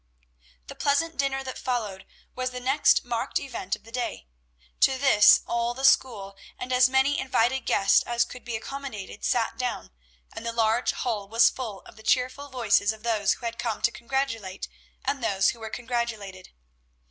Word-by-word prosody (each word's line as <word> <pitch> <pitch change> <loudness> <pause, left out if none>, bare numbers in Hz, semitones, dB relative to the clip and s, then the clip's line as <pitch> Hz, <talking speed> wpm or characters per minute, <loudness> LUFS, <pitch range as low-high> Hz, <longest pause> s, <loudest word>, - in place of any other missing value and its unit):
The - - -9
pleasant 310 +4 0
dinner 270 -1 0
that 260 -1 -6
followed 215 -7 -3 0.3
was 255 0 -2
the 250 0 -6
next 265 +2 +3
marked 235 -1 -2
event 235 -8 -3
of - - -20
the 225 - -15
day. 240 - -4 0.5
To 265 - +4
this 210 -6 +6
all 235 0 -1
the 265 +1 -1
school, 200 -8 +2 0.2
and 255 0 -4
as 250 0 +5
many 265 +2 +2
invited 260 -1 +1
guests 195 - +4
as 240 0 +1
could 250 - -11
be 240 -1 -4
accommodated, 220 -5 -7
sat 235 0 0
down, 250 - -3 0.4
and - - -7
the 230 0 -3
large 230 +1 +2
hall 210 -5 -3
was 230 +1 +5
full 220 -7 -6
of - - -16
the - - -13
cheerful 255 +5 0
voices 220 -5 +2
of 220 0 -11
those 220 -3 +2
who 240 - -10
had 230 0 -4
come 230 -3 -3
to 235 - +3
congratulate 230 -7 -3 0.4
and 275 -3 -1
those 195 -3 +2
who 235 - -13
were 220 -1 -6
congratulated. 230 -6 -4
235 Hz, 180 wpm, -26 LUFS, 220-260 Hz, 0.5 s, this